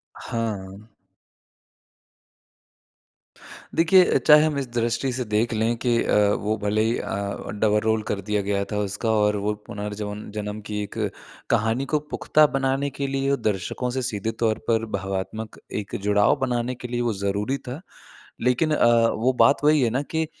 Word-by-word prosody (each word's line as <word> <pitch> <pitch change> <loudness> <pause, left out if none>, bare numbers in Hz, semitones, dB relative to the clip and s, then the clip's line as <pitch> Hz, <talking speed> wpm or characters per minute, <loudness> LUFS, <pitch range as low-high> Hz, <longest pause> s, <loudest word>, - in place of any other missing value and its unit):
हाँ। 105 -2 -5 2.9
देखिए, 180 +2 +5
चाहे 150 0 +8
हम 155 -2 0
इस 135 - -3
दृष्टि 120 +3 0
से 125 0 -2
देख 110 +2 0
लें 110 +2 +1
कि 120 -1 +1
अ, - - +1 0.2
वो 110 +2 -1
भले 105 +1 0
ही 115 +2 +1
अ, 100 +1 -4
डबल 105 0 +2
रोल 110 0 +1
कर 100 - -2
दिया 105 +1 -1
गया 100 0 -1
था 105 - -1
उसका 105 +3 -1
और 105 -1 +2
वो 105 - +1
पुनर्जवन 105 0 -5
जन्म 105 0 -4
की 105 0 -2
एक 100 - -9 0.5
कहानी 110 +5 +1
को 150 - +3
पुख़्ता 155 0 +4
बनाने 135 +1 0
के 140 - 0
लिए 135 0 0
दर्शकों 110 +3 -2
से - - +1
सीधे 115 -3 -2
तौर 110 -1 +2
पर 115 -1 +2
भावात्मक 95 +3 -5 0.2
एक 100 - -8
जुड़ाव 105 0 +4
बनाने 125 -1 -1
के 125 0 -7
लिए 120 0 -2
वो 120 -2 0
ज़रूरी 100 +6 -1
था। 135 +5 -8 0.6
लेकिन 125 +6 +2
अ, 120 -3 +4
वो 125 +4 +1
बात 130 +4 +3
वही 150 -1 +5
है 120 - +2
ना 130 +5 0
कि 160 +2 -2
110 Hz, 165 wpm, -24 LUFS, 105-130 Hz, 2.9 s, चाहे